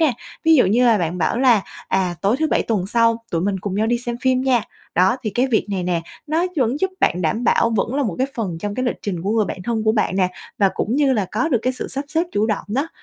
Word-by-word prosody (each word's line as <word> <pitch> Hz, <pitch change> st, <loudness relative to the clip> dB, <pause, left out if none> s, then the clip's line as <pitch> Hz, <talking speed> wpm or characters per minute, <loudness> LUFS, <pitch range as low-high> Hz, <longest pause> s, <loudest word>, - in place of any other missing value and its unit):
nè. 310 Hz, -6 st, +4 dB, 0.3 s
Ví 325 Hz, 0 st, +6 dB
dụ 250 Hz, -, +5 dB
như 230 Hz, +6 st, +3 dB
là 225 Hz, -3 st, +4 dB
bạn 175 Hz, 0 st, -2 dB
bảo 170 Hz, +8 st, 0 dB
là 245 Hz, -6 st, +4 dB, 0.3 s
"À, 185 Hz, -2 st, 0 dB
tối 200 Hz, +5 st, +2 dB
thứ 315 Hz, -, +2 dB
Bảy -, -, +2 dB
tuần 205 Hz, -5 st, -1 dB
sau 230 Hz, +1 st, +2 dB
tụi 165 Hz, -, 0 dB
mình 195 Hz, +1 st, -1 dB
cùng 195 Hz, 0 st, -4 dB
nhau 215 Hz, +2 st, +1 dB
đi 240 Hz, +1 st, +1 dB
xem 240 Hz, 0 st, -4 dB
phim 260 Hz, -1 st, +2 dB
nha?" 255 Hz, -4 st, +2 dB, 0.3 s
Đó, 185 Hz, +6 st, +3 dB
thì 215 Hz, -, -2 dB
cái 245 Hz, +6 st, +1 dB
việc 235 Hz, -5 st, +1 dB
này 190 Hz, -2 st, -1 dB
nè, 175 Hz, -1 st, 0 dB, 0.3 s
nó 320 Hz, +4 st, +1 dB
vẫn 260 Hz, +2 st, +1 dB
giúp 380 Hz, -, +1 dB
bạn 180 Hz, -, +2 dB
đảm 215 Hz, +9 st, 0 dB
bảo, 230 Hz, -, +3 dB
vẫn 230 Hz, +5 st, -1 dB
là 285 Hz, -, +1 dB
một 215 Hz, -10 st, -2 dB
cái 260 Hz, -, +2 dB
phần 190 Hz, -8 st, -3 dB
trong 205 Hz, +3 st, -4 dB
cái 255 Hz, -, -2 dB
lịch 245 Hz, -, -1 dB
trình 180 Hz, -5 st, -3 dB
của 195 Hz, -, -1 dB
người 220 Hz, -1 st, +2 dB
bạn 185 Hz, -2 st, -6 dB
thân 225 Hz, 0 st, -2 dB
của 220 Hz, -, +3 dB
bạn 210 Hz, -4 st, 0 dB
nè, 185 Hz, -2 st, +3 dB, 0.3 s
và 200 Hz, -2 st, +4 dB
cũng 230 Hz, +5 st, -1 dB
như 285 Hz, -2 st, +3 dB
là 210 Hz, -5 st, +1 dB
có 245 Hz, +10 st, 0 dB
được 255 Hz, -7 st, +2 dB
cái 255 Hz, -, +1 dB
sự 255 Hz, -, -6 dB
sắp 275 Hz, +2 st, -4 dB
xếp 325 Hz, +3 st, +1 dB
chủ 210 Hz, +2 st, +1 dB
động 215 Hz, -3 st, -1 dB
đó. 275 Hz, +9 st, -1 dB
225 Hz, 290 wpm, -20 LUFS, 195-255 Hz, 0.3 s, Ví